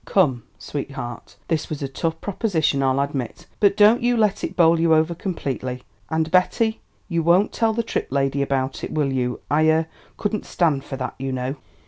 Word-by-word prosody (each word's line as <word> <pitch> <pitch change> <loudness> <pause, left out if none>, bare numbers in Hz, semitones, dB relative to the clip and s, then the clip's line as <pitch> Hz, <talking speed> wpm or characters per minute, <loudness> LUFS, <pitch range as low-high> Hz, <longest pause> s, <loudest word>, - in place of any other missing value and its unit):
Come, 135 -11 +2 0.2
sweetheart, 135 -4 -6
this 160 -3 -1
was 150 -2 -4
a - - -1
tough 160 +4 -3
proposition, 170 -9 0
I'll 135 0 +2
admit, 140 -4 -3
but 200 -1 +4
don't 215 +3 +6
you 240 0 +2
let 210 -3 +1
it - - -3
bowl 165 -1 +5
you 165 -1 +4
over 160 +2 +2
completely. 130 -8 -4 0.3
And, 160 0 0
Betty, 220 +5 +2 0.3
you 170 -3 0
won't 175 +5 +3
tell 225 -1 +1
the 235 +1 0
Tripp 225 - -3
lady 135 0 +1
about 135 -1 -1
it, - - -4
will 145 -3 0
you? 125 -1 -1
I 155 +2 +4
er 160 +1 +3 0.3
couldn't 210 0 -2
stand 150 -6 +1
for 135 - -6
that, 130 -1 -4
you 135 0 -3
know." 130 +1 -2
155 Hz, 190 wpm, -22 LUFS, 135-185 Hz, 0.3 s, don't